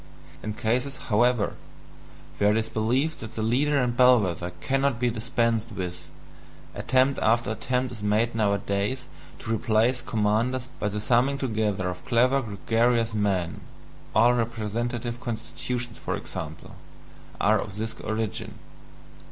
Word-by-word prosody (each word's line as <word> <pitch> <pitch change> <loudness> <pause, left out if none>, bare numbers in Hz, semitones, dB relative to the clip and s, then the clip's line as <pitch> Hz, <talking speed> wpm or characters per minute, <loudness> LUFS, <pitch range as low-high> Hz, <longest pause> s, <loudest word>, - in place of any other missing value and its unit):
In 105 - -4
cases, 125 +5 0
however, 120 0 +2 0.9
where 105 - +4
it 105 - +3
is 115 0 -1
believed 130 +9 0
that 110 - -8
the 110 - -2
leader 140 +6 +2
and 125 -3 +1
bell 125 -1 +7
wether 90 -3 -2
cannot 135 -3 +1
be 120 -1 +2
dispensed 115 0 0
with, 90 -4 -5 0.7
attempt 130 +2 +2
after 115 0 +2
attempt 125 +3 -1
is 115 -3 -8
made 105 +3 +1
nowadays 100 +3 0 0.3
to 115 - -3
replace 115 +3 +2
commanders 115 +4 0
by 105 - 0
the 105 0 -2
summing 125 +5 +2
together 110 -7 -1
of 90 0 -5
clever 130 +3 +3
gregarious 115 +1 +1
men 95 -5 0 0.6
all 120 +3 +6
representative 120 +1 -2
constitutions, 120 0 -4
for - - -2
example, - - -7 0.6
are 105 +1 +4
of 100 - -5
this 110 +1 -3
origin. 110 -2 -3
115 Hz, 135 wpm, -26 LUFS, 105-125 Hz, 0.9 s, bell